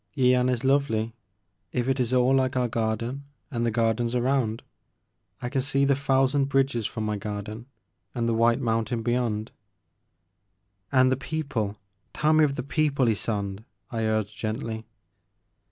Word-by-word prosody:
Yian 125 -1 +4
is 125 -1 -1
lovely, 125 -5 +1 0.3
— 90 - -49
if 120 - -1
it 135 0 +1
is 125 -1 +1
all 130 +1 +4
like 130 -1 +2
our 125 -1 +2
garden 115 +4 -2 0.3
and 120 -3 -1
the 120 - +2
gardens 115 +1 +1
around. 120 -3 +1 0.8
I - - -1
can 135 0 0
see 135 +1 +1
the 140 0 +3
thousand 135 0 +2
bridges 135 -5 +1
from 110 -2 -4
my 105 -1 -1
garden 105 +3 -6 0.5
and 120 -1 0
the 115 - +2
white 115 +2 +3
mountain 115 -1 -1
beyond 120 -2 -1 0.5
— 90 +2 -49
" 100 +1 -47
"And 130 -1 +5
the 130 - +2
people 130 -9 -3 0.2
— 100 - -46
tell 155 +1 +3
me 155 0 +5
of 140 -2 +2
the 125 - -3
people, 140 -1 +1
Ysonde! 105 -2 -1
" 95 0 -39
I 115 -1 -1
urged 110 -1 0
gently. 110 0 -4
120 Hz, 170 wpm, -26 LUFS, 110-135 Hz, 0.8 s, And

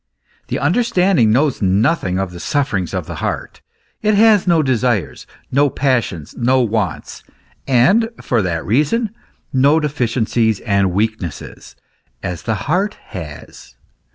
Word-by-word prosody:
The - - -2
understanding 190 - +2
knows 135 +3 +1
nothing 100 - +1
of 95 -1 -2
the 90 - -9
sufferings 110 - -1
of - - -3
the - - -7
heart; - - -4 0.4
it 215 -1 +2
has 210 -2 +4
no 165 -3 +4
desires, 120 - -1 0.2
110 140 +1 +2
passions, 120 - 0
no 130 +2 +2
wants, 110 -5 -2 0.4
and 180 - +3
for 120 -3 0
that 85 -4 -2
reason, 150 - +1 0.4
no 140 +4 +4
deficiencies 120 -6 0
and 100 -3 +1
weaknesses, 105 -4 -4 0.5
as 85 -2 -4
the 110 - -1
heart 190 +8 0
has. 75 -5 -10
120 Hz, 125 wpm, -18 LUFS, 100-150 Hz, 0.5 s, has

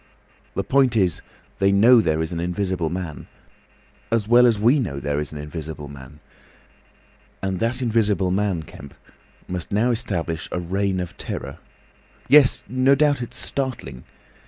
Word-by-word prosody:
The - - -1
point 130 -4 +2
is, 95 -4 +1 0.4
they 95 0 +3
know 115 +5 +6
there 80 -4 0
is 80 - -5
an 85 - -3
Invisible 90 -1 -2
Man—as 95 +5 -7
well 120 +2 +6
as 115 -3 +2
we 120 +8 +3
know 80 - -3
there 70 +1 -2
is 75 - -4
an 75 - -8
Invisible 75 0 -7
Man. 70 +1 -12 1.2
And 95 -1 -2
that 120 +3 -1
Invisible 105 -5 +1
Man, 95 -4 0
Kemp, 70 -2 -13 0.5
must 90 -2 -5
now 110 +5 +2
establish 85 -8 -2
a - - -2
Reign 95 +2 -1
of 90 -1 -5
Terror. - - -6 0.7
Yes; 145 -3 +6
no 130 +2 +3
doubt 145 -2 +2
it's 120 - -6
startling. 120 - -4
95 Hz, 150 wpm, -22 LUFS, 80-120 Hz, 1.2 s, know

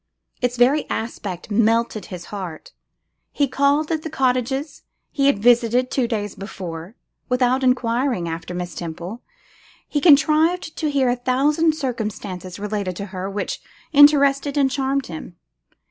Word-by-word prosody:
Its 245 0 0
very 265 +5 +3
aspect 205 -4 -5
melted 225 0 +1
his 180 -2 -8
heart. 180 -6 -7 0.6
He 285 - +1
called 280 +4 +1
at 315 -1 0
the 320 - -5
cottages 270 +1 -1 0.3
he 275 -2 +1
had 280 - +3
visited 240 +3 +3
two 255 -3 +1
days 210 -4 -3
before. 185 -1 -8 0.3
Without 250 +1 +2
enquiring 250 -5 +1
after 165 +2 -5
Miss 175 -1 -4
Temple, 175 +8 -6 0.7
he 290 - -1
contrived 320 +2 +4
to 310 - -1
hear 275 -3 +2
a 245 - +2
thousand 290 +6 +2
circumstances 210 - -4
relating 205 -3 -3
to 200 - -5
her 185 +1 -4
which 200 +1 -4 0.3
interested 285 -1 +5
and 270 -2 +3
charmed 270 0 0
him. 175 +1 -8
245 Hz, 140 wpm, -21 LUFS, 200-280 Hz, 0.7 s, interested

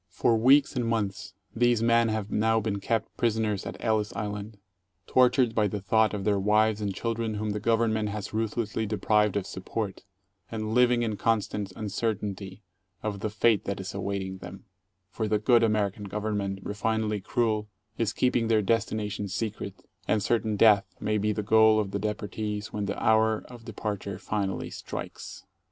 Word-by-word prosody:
For 115 - +2
weeks 135 +6 +5
and 125 - 0
months 105 -6 -2 0.2
these 120 -1 +3
men 115 0 +4
have 110 -2 -2
now 110 +1 +2
been 105 -2 -2
kept 115 +2 -2
prisoners 110 -3 0
at - - -6
Ellis 110 -2 0
Island, 105 0 -5 0.5
tortured 125 0 +3
by 110 -2 +2
the 105 +1 -3
thought 110 +3 +2
of 100 - -4
their 100 -1 +2
wives 105 +1 +3
and 100 -1 -1
children 115 +2 -2
whom 105 0 -2
the 105 - -2
Government 110 -1 +1
has 105 0 -5
ruthlessly 110 0 -1
deprived 105 -1 +2
of 100 - -2
support, 95 +1 -4 0.5
and 110 -1 -3
living 125 0 +4
in 110 -3 -2
constant 105 -2 0
uncer 110 +1 -1
tainty 100 -1 -7 0.4
of 105 -2 -3
the 110 - -2
fate 110 0 +2
that 100 0 -3
is 95 - -5
awaiting 95 -1 -3
them, 90 +3 -10 0.5
for 110 +3 -2
the 105 0 +2
good 115 +3 +4
American 105 -2 0
Gov 105 +2 -4
ernment, 100 -3 -2
refinedly 105 -1 -1
cruel, 110 -1 0 0.3
is 115 -2 +1
keeping 120 -2 +1
their 110 -2 +3
destination 105 -1 -1
secret, 100 -1 -5 0.2
and 105 -2 +2
certain 110 -1 +1
death 100 -3 +4
may 105 0 0
be 105 +1 +1
the 105 0 -2
goal 110 +1 +5
of 100 -2 -2
the 100 - -2
deportees 105 0 -4
when 105 -1 -2
the - - -3
hour 110 -1 +3
of 120 -2 -12
departure 100 -3 -4
finally 100 0 -3
strikes. - - -7
105 Hz, 175 wpm, -27 LUFS, 100-110 Hz, 0.5 s, weeks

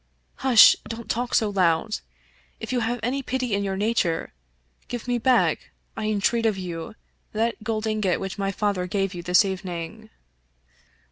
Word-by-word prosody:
" - - -43
Hush 240 -5 +9
I - - -13
don't 230 0 -6
talk 245 +2 -1
so 215 -2 +2
loud. 185 +2 +1 0.6
If - - -6
you 250 - +2
have 240 +1 -1
any 260 +4 -1
pity 255 -3 -2
in 200 0 +1
your 195 -1 -2
nature, 200 - 0 0.5
give 245 -1 -6
me 245 -1 0
back, 255 +1 +2 0.3
I 220 - -4
entreat 215 +2 +1
of 210 -3 0
you, 175 0 -6 0.4
that 225 +1 -1
gold 220 0 -2
ingot 215 -4 0
which 195 +1 -5
my 195 0 0
father 195 -2 -1
gave 195 0 -1
you 175 - -6
this 180 +3 +4
evening." 190 +2 -5
215 Hz, 175 wpm, -24 LUFS, 190-230 Hz, 0.6 s, Hush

